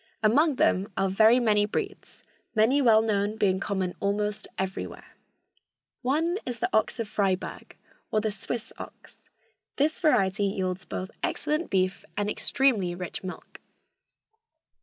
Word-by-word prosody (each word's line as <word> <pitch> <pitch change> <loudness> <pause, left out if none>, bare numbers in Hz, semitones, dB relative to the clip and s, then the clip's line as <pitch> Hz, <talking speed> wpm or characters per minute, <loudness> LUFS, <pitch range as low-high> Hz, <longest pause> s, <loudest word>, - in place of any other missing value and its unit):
Among 285 +8 +4
them 200 -4 +2
are 195 -1 +1
very 220 +5 +6
many 210 -3 +3
breeds, 400 - -5 0.3
many 235 +7 +4
well 220 -4 +5
known 210 -1 0
being 190 -3 +2
common 190 -2 -2
almost 205 +1 -1
everywhere. 190 0 -5 0.9
One 320 +8 0
is 245 -2 -4
the 230 - -1
ox 220 +2 +1
of 230 - -2
Freiburg, 195 -3 -2 0.3
or 215 - +1
the 215 0 -1
Swiss 220 +3 -5
ox. - - -12 0.5
This 300 +3 +1
variety 200 - +2
yields 185 -2 -2
both 185 - -5
excellent 305 +3 -1
beef 185 -1 0
and 205 0 0
extremely 215 -12 +1
rich 180 +1 -6
milk. 185 - -9
210 Hz, 135 wpm, -27 LUFS, 195-245 Hz, 0.9 s, very